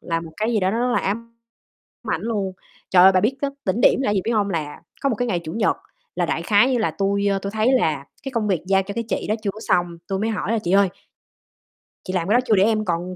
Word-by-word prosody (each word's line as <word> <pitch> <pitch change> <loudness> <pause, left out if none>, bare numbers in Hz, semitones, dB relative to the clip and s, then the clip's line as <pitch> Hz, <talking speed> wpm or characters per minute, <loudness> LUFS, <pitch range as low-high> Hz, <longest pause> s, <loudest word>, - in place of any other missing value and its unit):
là 165 -1 -2
một 165 - -9
cái 220 +2 -1
gì 215 - +1
đó 185 +1 +2
nó 225 - -1
rất 245 0 +1
là - - +2
ám 230 +4 -4 0.7
ảnh - - -1
luôn. 205 -4 -2 0.4
Trời 180 -1 +6
ơi, 190 - +8
bà 185 - +3
biết 235 +7 +1
cái 280 - 0
đỉnh 195 +5 0
điểm - - +5
là 270 - -1
cái 205 - +1
gì 195 - +2
biết 230 - -1
hông? 205 -2 +1
Là 155 -4 -4 0.2
có 275 - +2
một 240 - 0
cái 245 +2 -1
ngày 175 -4 0
Chủ 155 - -5
nhật 220 +2 +1 0.4
là - - +1
đại - - -2
khái 225 +4 +4
như 245 - +1
là 210 -7 +1
tui, 200 +4 0
ơ, 195 -1 +2
tui 200 +1 -5
thấy 220 +4 +1
là 155 - +1 0.2
cái 270 -1 -6
công 220 -3 -1
việc 185 -5 0
giao 195 0 +3
cho 200 +1 -7
cái 230 0 -2
chị - - -2
đó 215 - +2
chưa 200 - 0
có 215 +2 -11
xong, 175 -5 +2 0.2
tui 195 -1 -1
mới 220 +2 -1
hỏi 220 0 -2
là 230 - +1
"Chị 175 - -1
ơi, 200 0 +5 1.2
chị 185 - -5
làm 180 -2 -1
cái 225 - +4
đó - - +6
chưa 220 - +4
để 190 - +4
em 215 0 +1
còn 180 +1 -2
200 Hz, 295 wpm, -22 LUFS, 185-230 Hz, 1.2 s, ơi